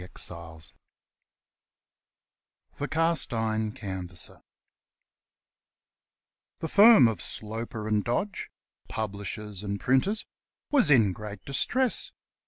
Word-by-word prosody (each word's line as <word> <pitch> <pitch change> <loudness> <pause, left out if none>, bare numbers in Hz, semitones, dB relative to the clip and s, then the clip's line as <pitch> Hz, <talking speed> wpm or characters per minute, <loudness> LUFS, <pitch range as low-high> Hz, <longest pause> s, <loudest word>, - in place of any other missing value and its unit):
19 85 -3 -5 2.1
The - - -1
Cast 165 +1 +1
iron 110 -1 0
Canvasser 95 -4 -6 2.2
THE 160 - -4
firm 205 - +8
of 110 -7 -2
Sloper 110 0 -5
and 105 -1 +1
Dodge, 185 - -2 0.4
publishers 105 -1 -5
and 100 -1 -3
printers, 135 - +1 0.5
was 280 - +4
in 110 -9 +5
great 105 -1 -8
distress. 245 - +1
110 Hz, 85 wpm, -28 LUFS, 100-145 Hz, 2.2 s, firm